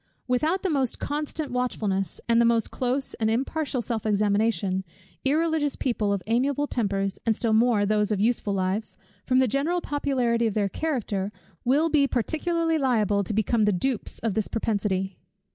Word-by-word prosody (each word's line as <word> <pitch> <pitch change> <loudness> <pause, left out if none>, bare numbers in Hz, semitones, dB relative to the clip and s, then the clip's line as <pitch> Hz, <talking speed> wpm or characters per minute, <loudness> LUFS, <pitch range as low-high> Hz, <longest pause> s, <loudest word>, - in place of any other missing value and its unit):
Without 310 +10 +1
the 380 - +1
most 270 -5 0
constant 300 -1 -3
watchfulness, 210 -7 -1
and 235 0 +4
the - - +5
most 230 -1 +2
close 260 +1 -1
and 220 -1 +2
impartial 265 +2 -1
self 225 -3 -3
examination, 205 -2 +1 0.4
irreligious 305 0 +1
people 225 -6 0
of 200 -2 -1
amiable 270 +6 +1
tempers, 195 -7 -1
and 225 -1 +2
still 225 0 0
more 220 -2 +4
those 210 0 +1
of 210 -3 0
useful 215 -2 +1
lives, 190 +3 -1 0.3
from 255 - +3
the 260 0 +4
general 290 +9 0
popularity 255 -7 0
of 215 - -3
their 205 -2 +1
character, 210 -9 -2 0.3
will 285 +6 +3
be 295 -3 +3
particularly 325 +6 0
liable 215 -7 +2
to 200 - -5
become 220 +2 +1
the 210 - +3
dupes 230 +5 -2
of 225 -3 0
this 215 0 -1
propensity. 200 -4 -1
235 Hz, 165 wpm, -26 LUFS, 210-275 Hz, 0.4 s, the